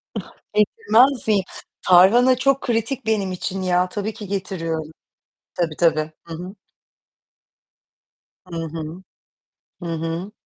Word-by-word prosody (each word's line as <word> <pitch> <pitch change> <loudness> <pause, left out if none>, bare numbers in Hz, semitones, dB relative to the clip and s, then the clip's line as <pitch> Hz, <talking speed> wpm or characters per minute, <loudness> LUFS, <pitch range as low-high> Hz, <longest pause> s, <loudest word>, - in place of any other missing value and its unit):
Ah, - - -6 0.2
getirmez 250 - +3
miyim? 205 -3 +3 0.4
Tarhana 215 +8 +6
çok 275 +1 +2
kritik 235 +2 -1
benim 205 -4 0
için 185 +1 -3
ya. 180 0 +1
Tabii 205 +3 -3
ki 210 - -9
getiriyorum. 165 -5 -3 0.6
Tabii 165 -3 -1
tabii. 155 -2 +2
Hı 165 - -8
hı. 180 +5 -7 1.9
Hı 180 -2 -9
hı. 160 +2 -6 0.8
Hı - - -5
hı. 165 +4 -4
190 Hz, 115 wpm, -22 LUFS, 165-220 Hz, 1.9 s, Tarhana